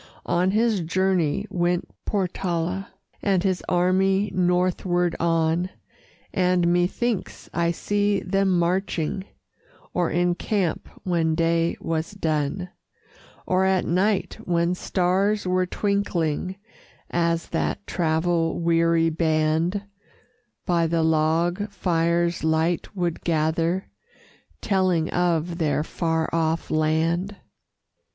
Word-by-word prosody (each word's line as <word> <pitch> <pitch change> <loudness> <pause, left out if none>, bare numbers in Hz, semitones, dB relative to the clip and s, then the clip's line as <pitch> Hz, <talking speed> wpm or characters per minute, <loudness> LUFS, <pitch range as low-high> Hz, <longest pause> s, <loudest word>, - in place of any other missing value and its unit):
On 180 +2 +2
his 220 +1 +2
journey 180 0 +1
went 175 0 0 0.2
Portala, 185 -1 -1 0.3
And 190 -3 +1
his 185 -2 0
army 190 +3 +2
northward 180 -1 +1
on, 165 +1 +1 0.6
And 180 -2 +2
methinks 195 +5 -1
I 170 0 +1
see 205 +3 0
them 195 -1 +1
marching, 180 0 0 0.7
Or 175 -2 +1
in 175 +1 +2
camp 185 -2 -2
when 165 -3 +1
day 165 0 +1
was 165 +2 -3
done; 160 0 -1 0.8
Or 185 +1 +2
at 190 -1 +2
night 190 +4 0
when 170 0 +1
stars 190 +3 0
were 185 0 +1
twinkling, 185 -4 -1 0.6
As 170 -1 0
that 205 - -2
travel 165 0 0
weary 165 -1 +3
band 160 +4 +1 0.8
By 170 -2 +2
the 165 0 +1
log 165 +5 +1
fire's 170 -3 0
light 160 +4 0
would 175 -3 -2
gather, 165 +3 0 0.8
Telling 185 -5 +1
of 175 -1 0
their 150 -2 +1
far 160 -1 -1
off 165 0 0
land. 165 +5 +1
175 Hz, 100 wpm, -24 LUFS, 165-185 Hz, 0.8 s, weary